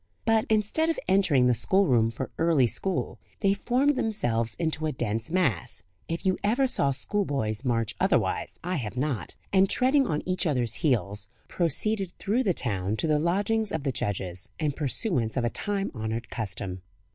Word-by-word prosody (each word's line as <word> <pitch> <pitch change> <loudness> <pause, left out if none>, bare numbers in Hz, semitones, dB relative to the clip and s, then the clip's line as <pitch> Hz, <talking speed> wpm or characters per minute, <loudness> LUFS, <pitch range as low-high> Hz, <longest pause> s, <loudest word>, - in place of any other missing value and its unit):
But, 225 -1 +3
instead 220 +10 +2
of 330 - 0
entering 180 -10 +4
the 125 - +4
schoolroom 125 - +3
for 115 - -5
early 165 -6 +4
school, 185 - -1 0.2
they 195 -2 +4
formed 255 +7 +1
themselves 115 - -1
into 160 -2 -1
a - - 0
dense 115 -3 -2
mass 160 - 0 0.2
(if 165 +3 -4
you 185 -1 +2
ever 235 +6 +3
saw 195 - +1
schoolboys 135 - -1
march 115 -4 0
otherwise, - - +1
I 180 +1 -1
have 120 -3 -5
not), 135 -3 -2 0.2
and, 190 0 +5
treading 265 +1 +3
on 150 -1 -1
each 185 0 0
other's 125 -7 0
heels, 105 -8 0 0.2
proceeded 190 +3 0
through 220 +6 0
the 210 -7 +2
town 100 -3 -1
to - - 0
the 155 -2 +2
lodgings 200 +6 +1
of 160 -3 -2
the 140 - 0
judges, 95 -5 -3
in 155 -2 +1
pursuance 135 - 0
of 120 - +1
a 120 - 0
time 200 -1 -2
honoured 110 0 -4
custom. 95 -4 -4
155 Hz, 170 wpm, -27 LUFS, -, 0.2 s, and